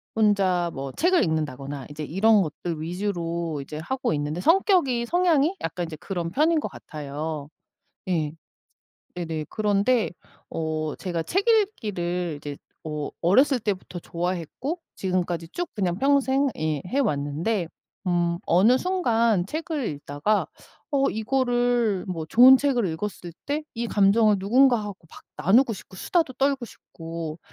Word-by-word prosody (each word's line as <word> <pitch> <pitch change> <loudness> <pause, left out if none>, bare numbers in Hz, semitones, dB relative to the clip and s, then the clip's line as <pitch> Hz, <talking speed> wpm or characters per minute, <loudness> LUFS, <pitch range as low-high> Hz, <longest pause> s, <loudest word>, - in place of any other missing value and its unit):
혼자 195 -5 +2
뭐 135 0 -5
책을 355 - +3
읽는다거나, 145 - -3
이제 150 +1 -6
이런 205 +7 +4
것들 160 -1 -4
위주로 170 -3 -3
이제 150 +2 -8
하고 255 +7 -2
있는데 150 +3 -2
성격이 330 - +3
성향이 345 +1 +2
약간 170 +2 -3
인제 160 -2 -8
그런 175 -1 -4
편인 310 - +3
것 - - -4
같아요. 150 0 -6 0.6
예. 155 -5 0 0.8
네네. 160 -3 -3
그런데 215 +3 +1 0.4
어 155 -1 -2
제가 170 -3 -3
책 390 - 0
읽기를 180 - 0
이제 145 -1 -6 0.3
어 150 -2 -4
어렸을 260 - +4
때부터 195 -5 -3
좋아했고 175 - -3 0.2
지금까지 175 -3 -2
쭉 350 - -4
그냥 185 -4 -1
평생 275 +1 +3
예 155 -2 -1
해 265 +9 0
왔는데, 165 - -1 0.4
음 175 -1 +1
어느 210 +9 +5
순간 235 - +2
책을 310 - -3
읽다가 145 +7 -1 0.4
어 275 -2 +2
이거를 240 -3 +1
뭐 170 -4 -4
좋은 250 +10 +8
책을 260 -5 +1
읽었을 175 +1 -5
때 290 +2 -2
이 235 0 -2
감정을 210 +1 +4
누군가하고 215 0 +3
막 - - -12 0.2
나누고 230 - +5
싶고, 190 -2 -10
수다도 320 - 0
떨고 270 -1 +1
싶고, 165 -6 -8
195 Hz, 280 characters per minute, -25 LUFS, 165-255 Hz, 0.8 s, 좋은